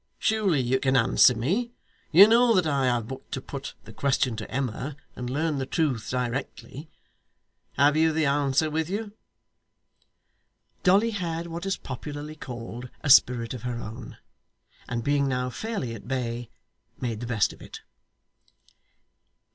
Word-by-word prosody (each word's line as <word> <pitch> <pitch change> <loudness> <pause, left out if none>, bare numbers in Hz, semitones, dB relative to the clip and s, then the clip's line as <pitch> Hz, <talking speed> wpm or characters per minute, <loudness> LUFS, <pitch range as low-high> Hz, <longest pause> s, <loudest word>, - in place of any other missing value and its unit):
Surely 210 -8 +1
you 130 +1 +1
can 130 0 +2
answer 125 0 +5
me. 195 - -1 0.4
You 190 +6 +9
know 235 +1 +5
that 185 - +3
I 140 -3 +1
have 120 -3 0
but 130 +1 -9
to - - -2
put 140 +2 -7
the - - -12
question 135 -3 0
to 110 - -6
Emma 135 +2 -3 0.2
and 125 0 -5
learn 150 +2 -1
the 130 - -3
truth 135 -10 -1
directly. 130 +4 -4 0.8
Have 145 +1 +4
you 160 +1 +4
the 155 0 +1
answer 140 +2 +1
with 160 +1 -1
you?' 205 +1 -4 1.7
Dolly 200 +5 +4
had 170 -5 -3
what 170 +2 -5
is 195 - 0
popularly 145 +3 -7
called 120 -3 -8
a 145 - +2
spirit 120 -3 +5
of 125 - -7
her 120 0 -3
own, 115 +2 -8 0.7
and 115 -1 -2
being 140 +1 +2
now 125 -1 -1
fairly 195 - -4
at 115 - -10
bay, 120 -2 -3 0.5
made 115 -4 -3
the 120 - -5
best 115 -3 +1
of - - -17
it. - - -10
135 Hz, 155 wpm, -26 LUFS, 125-160 Hz, 1.7 s, You